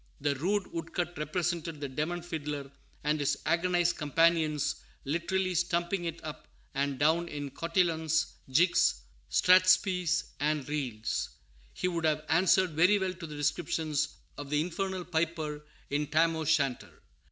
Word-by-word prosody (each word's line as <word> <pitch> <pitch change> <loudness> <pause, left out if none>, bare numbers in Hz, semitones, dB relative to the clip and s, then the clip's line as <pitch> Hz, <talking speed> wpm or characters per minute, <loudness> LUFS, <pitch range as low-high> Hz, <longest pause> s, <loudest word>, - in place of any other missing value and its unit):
The 145 0 +1
rude 195 +7 0
wood 165 -1 -6
cut 175 0 -1
represented 165 +1 -2
the 145 - -3
demon 155 +6 -3
fiddler 150 -5 -5 0.3
and 150 +1 +1
his 145 - +1
agonized 175 +1 +2
companions 150 -1 +2 0.3
literally 185 +5 0
stumping 175 +1 0
it 165 0 -4
up 155 -1 -8 0.3
and 140 0 -1
down 160 +4 +2
in 145 -3 -5
"cotillons, 160 -2 +1 0.2
jigs, 145 - +3 0.3
strathspeys, 185 -1 +4 0.2
and 150 -1 0
reels." 125 -8 -2 0.5
He - - -1
would 170 -2 -1
have 155 -1 +1
answered 185 +2 +4
very 180 +7 +4
well 190 -2 -1
to 170 -2 -8
the 150 - -8
description 155 +1 -1 0.5
of 145 -1 -6
the 150 0 +1
infernal 185 +2 -3
piper 160 -3 -2 0.3
in 145 +1 0
Tam 165 +2 +3
O'Shanter. 155 -5 -1
160 Hz, 140 wpm, -30 LUFS, 150-175 Hz, 0.5 s, strathspeys